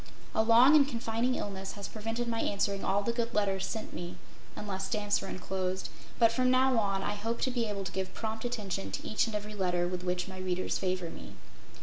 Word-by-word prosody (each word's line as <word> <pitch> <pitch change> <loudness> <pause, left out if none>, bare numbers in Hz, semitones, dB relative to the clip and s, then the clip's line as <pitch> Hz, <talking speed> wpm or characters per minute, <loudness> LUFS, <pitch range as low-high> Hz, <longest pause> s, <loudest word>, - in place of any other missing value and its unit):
A - - +4
long 235 +6 +7
and 285 -2 +7
confining 235 0 0
illness 195 -1 -4
has 200 -1 -6
prevented 225 +2 -3
my 230 -1 0
answering 200 -1 0
all 200 +1 +2
the 235 - +1
good 235 -1 -2
letters 195 -2 +1
sent 220 - -5
me 175 0 -6 0.4
unless 195 -2 -3
stamps 205 -2 +1
were 195 - -5
enclosed 185 0 -3 0.3
but 230 -1 +6
from 255 +2 +2
now 255 -1 +4
on 195 -2 0
I - - 0
hope 225 +3 -2
to 260 - +1
be 240 -2 0
able 200 -2 -3
to 185 - -5
give 190 0 -3
prompt 220 0 -3
attention 205 -6 -2
to - - -4
each 215 - +2
and 220 - -4
every 210 0 -4
letter 180 -3 +1
with 180 0 -3
which 180 0 -1
my 190 -1 -7
readers 185 0 -1
favor 185 -3 -1
me. - - -10
205 Hz, 220 wpm, -31 LUFS, 190-230 Hz, 0.4 s, long